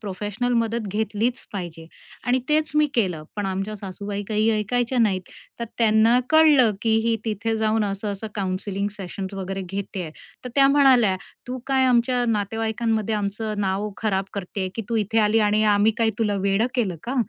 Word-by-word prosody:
Professional 210 +4 -3
मदत 230 -1 -2
घेतलीच 220 +3 -1
पाहिजे. 170 -4 -6 0.4
आणि 250 +1 +3
तेच 305 0 +2
मी 300 - +5
केलं. 180 -9 0
पण 205 -1 -2
आमच्या 195 +3 -3
सासूबाई 200 +1 -5
काही 215 +1 +1
ऐकायच्या 240 +4 0
नाहीत. 195 -5 +2 0.4
तर - - -1
त्यांना 225 +2 +4
कळलं, 300 -8 +6
की 225 - +1 0.2
ही 230 -1 +2
तिथे 220 +1 -1
जाऊन 220 0 +1
असं 200 +1 -3
असं 200 +3 -6
काउन्सिलिंग 195 +1 -2
सेशन्स 195 0 -6
वगैरे 195 0 -4
घेतेय. 195 -4 -4 0.3
तर - - -4
त्या 275 0 +6
म्हणाल्या, 260 -9 +5 0.3
"तू 255 - -3
काय 265 -1 +2
आमच्या 245 0 +2
नातेवाईकांमध्ये 220 +1 -1
आमचं 210 +1 -2
नाव 200 +2 -1
खराब 195 -3 0
करते, 190 0 -3
की 225 - -3
तू 230 - 0
इथे 225 +3 0
आली 220 +2 +3
आणि 215 +1 +2
आम्ही 215 +2 +3
काय 225 -1 +3
तुला 210 -2 +1
वेडं 200 +4 +2
केलं 200 -9 0
का? 250 - -4
215 Hz, 170 wpm, -23 LUFS, 195-230 Hz, 0.4 s, कळलं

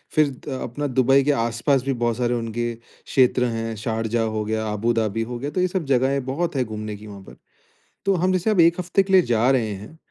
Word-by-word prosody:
फिर 155 -1 +5 0.2
अ, 130 -2 -4
अपना 145 +5 -3
दुबई 135 +1 +3
के 145 - +2
आस-पास 120 +2 +1
भी 135 0 -1
बहुत 120 -1 -1
सारे 120 -1 0
उनके 120 0 -2
क्षेत्र 125 +2 0
हैं, 115 -1 -3
शारजाह 115 +1 -1
हो 110 - -1
गया, 110 0 -2
अबू 115 +3 0
धाबी 115 -1 -1
हो 120 - -4
गया 140 - -3
तो 185 - -1
ये 185 - +3
सब 180 -2 -3
जगहें 135 0 +1
बहुत 150 +5 -2
है 130 - +2
घूमने 110 -2 -6
की 105 +1 -12
वहाँ 100 -1 -10
पर। - - -15 0.7
तो 195 - +3
हम 185 +2 +1
जैसे 185 +3 0
अब 210 -5 +2
1 170 +2 +5
हफ़्ते 180 +2 +1
के 195 - -3
लिए 185 - +8
जा 120 -2 +2
रहे 115 -5 +1
हैं 105 +11 -11
120 Hz, 235 wpm, -23 LUFS, 115-145 Hz, 0.7 s, लिए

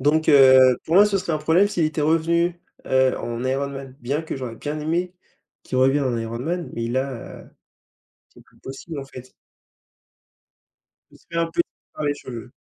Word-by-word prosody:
donc 155 +3 +2
heu, 130 -3 +7
pour 165 - -1
moi, 205 +2 +7
ce 200 -1 0
serait 170 -3 -3
un 155 - 0
problème 160 +6 +3
s'il 175 -6 0
était 155 0 -2
revenu, 170 +2 +1 0.3
heu, 130 0 +2
en 120 +1 -4
Iron 135 +2 -1
Man. 135 -1 -9
Bien 140 +6 -2
que 160 - -5
j'aurais 125 -4 -6
bien 150 +1 -4
aimé 175 +4 -2 0.5
qu'il 130 - -3
revienne 135 +2 +3
en 125 -3 0
Iron 115 +1 -4
Man, 170 +6 -3
mais 115 0 -3
là, 130 0 -4 0.8
c'est - - -19
plus - - -27
possible 140 +3 -8
en 135 - -5
fait. 130 -1 -12 1.8
Ce - - -18
serait 165 0 -4
un 165 - -1
peu - - 0 0.3
par - - -5
les 145 0 +1
cheveux. 120 -3 -9
140 Hz, 185 wpm, -22 LUFS, 130-165 Hz, 1.8 s, heu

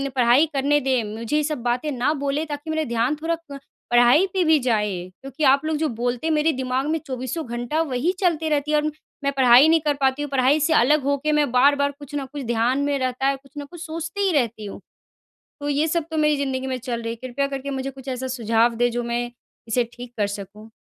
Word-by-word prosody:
पढ़ाई 250 +4 +5
करने 285 +2 +2
दें। 260 -3 0
मुझे 230 +5 -3
ये 305 - +1
सब 300 -3 -3
बातें 245 +5 -1
ना 260 +3 0
बोलें 285 +1 -2
ताकि 295 +1 -6
मेरा 315 0 0
ध्यान 235 +2 0
थोड़ा 335 +1 0 0.2
क 280 - -7 0.3
पढ़ाई 245 +8 +5
पे 375 -2 +2
भी 320 -1 +5
जाए 220 -5 0 0.3
क्योंकि 270 +3 -6
आप 275 +2 +4
लोग 310 -1 0
जो 315 +1 0
बोलते 245 +5 -2
हैं 320 - +2
मेरे 305 +1 +2
दिमाग 260 0 -1
में 320 - +1
24सों 260 +5 -4
घंटा 240 +6 -2
वही 290 +2 0
चलते 330 -4 +1
रहती 300 0 0
है 305 - +4
और 300 - 0 0.4
मैं 280 - +1
पढ़ाई 255 +2 +7
नहीं 325 0 +5
कर 295 -1 +1
पाती 265 +1 +2
हूँ। 290 - -3
पढ़ाई 270 +2 +3
से 315 +2 +2
अलग 295 +4 +4
होके 280 +2 0
मैं 295 -4 +2
बार-बार 280 +3 +3
कुछ 290 0 -9
न 280 -2 -2
कुछ 290 -2 -5
ध्यान 235 +3 +1
में 285 -1 0
रहता 255 +1 -1
है, 275 - +2
कुछ 270 0 -18
न 290 - -5
कुछ 345 -2 -10
सोचती 335 +4 -5
ही - - +2
रहती 230 -3 -3
हूँ। 200 - -8 0.8
तो 290 - -3
ये 290 +2 +1
सब 335 0 0
तो 320 - -3
मेरी 300 -1 +3
ज़िंदगी 265 -2 -2
में 260 -1 -2
चल 235 -1 -4
रही 230 0 -3
है। - - -7
कृपया 275 +3 -1
करके 275 0 -5
मुझे 270 0 -3
कुछ 270 0 -12
ऐसा 260 0 -3
सुझाव 230 -1 +1
दें 245 +1 +2
जो 240 +1 -2
मैं 240 0 -2 0.4
इसे 240 +2 +1
ठीक 245 0 -10
कर 205 - +2
सकूँ? 205 +2 -8
275 Hz, 240 wpm, -23 LUFS, 245-300 Hz, 0.8 s, पढ़ाई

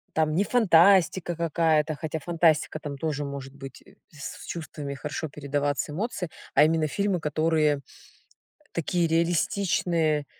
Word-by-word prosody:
Там 155 -1 +1
не 190 +5 +2
фантастика 185 -5 +4
какая-то, 160 -2 +1
хотя 160 +1 -4
фантастика 160 -1 +1
там 145 -3 -7
тоже 150 -1 -2
может 140 -1 -7
быть 135 -1 -10 0.3
с 145 -3 -8
чувствами, 150 -4 -6
хорошо 150 +2 -5
передаваться 145 0 -2
эмоции. 200 +1 -3 0.3
А 145 - +7
именно 160 0 +2
фильмы, 200 +3 0
которые, 155 -1 +1
э, - - -12 0.9
такие 170 +1 0
реалистичные. 165 -2 +1
160 Hz, 125 wpm, -26 LUFS, 145-170 Hz, 0.9 s, А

